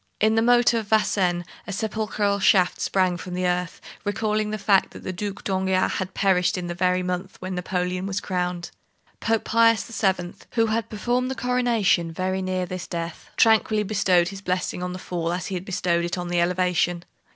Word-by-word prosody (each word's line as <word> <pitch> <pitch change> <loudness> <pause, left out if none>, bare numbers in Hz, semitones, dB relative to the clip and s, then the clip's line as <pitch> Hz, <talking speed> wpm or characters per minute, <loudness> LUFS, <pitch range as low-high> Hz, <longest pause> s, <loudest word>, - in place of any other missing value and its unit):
In 215 +1 +3
the 225 - +3
moat 240 +1 +4
of 225 -3 -1
Vincennes 185 -5 +1 0.2
a - - -4
sepulchral 210 -1 -1
shaft 185 -2 +3
sprang 185 -2 +1
from 180 0 -7
the 180 0 -1
earth, 180 0 -1 0.2
recalling 210 +1 -1
the 215 - -2
fact 195 -2 +3
that - - -11
the 185 - -4
Duc 200 +2 -5
d'Enghien 190 -1 +1
had 190 -1 -4
perished 190 0 +2
in 180 - -3
the 175 - -3
very 180 +1 +1
month 180 +1 -4
when 185 +1 -5
Napoleon 180 +1 -2
was 195 0 -2
crowned. 180 -2 -3 0.5
Pope 225 -1 0
Pius 230 -1 +3 0.2
VII., 185 -3 +1 0.2
who 225 -2 +3
had 225 +1 -1
performed 245 +4 -1
the 265 - -3
coronation 240 -9 +1
very 185 +3 -2
near 185 -1 -1
this 180 0 -6
death, 170 -1 -5
tranquilly 220 -1 +4
bestowed 190 -4 +2
his 195 0 -8
blessing 180 -1 -2
on 180 0 -3
the - - -5
fall 170 -2 -3
as 180 +1 -3
he - - -5
had 185 0 -4
bestowed 175 -2 0
it 175 +1 -2
on 175 0 -4
the 175 0 +2
elevation. 175 -1 +1
185 Hz, 195 wpm, -24 LUFS, 180-210 Hz, 0.5 s, moat